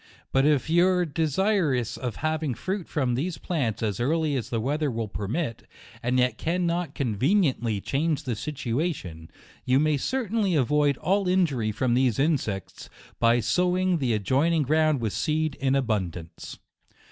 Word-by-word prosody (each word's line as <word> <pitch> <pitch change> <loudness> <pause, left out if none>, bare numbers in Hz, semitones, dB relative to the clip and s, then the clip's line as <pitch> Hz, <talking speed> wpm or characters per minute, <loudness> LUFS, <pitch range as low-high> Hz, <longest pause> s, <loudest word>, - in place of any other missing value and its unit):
But 135 +2 +3
if 150 -3 +2
you 175 +3 +4
are 180 -1 +2
desirous 160 - 0
of 125 -3 -4
having 155 -4 -1
fruit 190 - -4
from 130 -5 0
these 160 +8 -2
plants 120 - -2
as 105 -4 -1
early 155 +3 +1
as 125 - -3
the 115 - -1
weather 145 +5 0
will 115 -3 -3
per 100 0 -5
mit, 120 - -3 0.3
and 125 +2 0
yet 125 -3 +1
cannot 170 -2 -1
conveniently 130 - +1
change 150 +5 -1
the 125 -4 -2
situation, 120 - -3 0.3
you 130 +1 +3
may 155 0 +2
certainly 220 - 0
avoid 145 0 +2
all 195 +3 +1
injury 150 -12 +1
from 120 +3 0
these 125 -2 +2
insects, 135 - -1 0.3
by 115 +1 +4
sowing 180 +3 +1
the 125 -4 +1
adjoining 140 - +2
ground 155 -1 +2
with 110 -3 -2
seed 155 -1 0
in 135 0 +2
abundance. 95 -10 -3
140 Hz, 155 wpm, -26 LUFS, 120-165 Hz, 0.3 s, you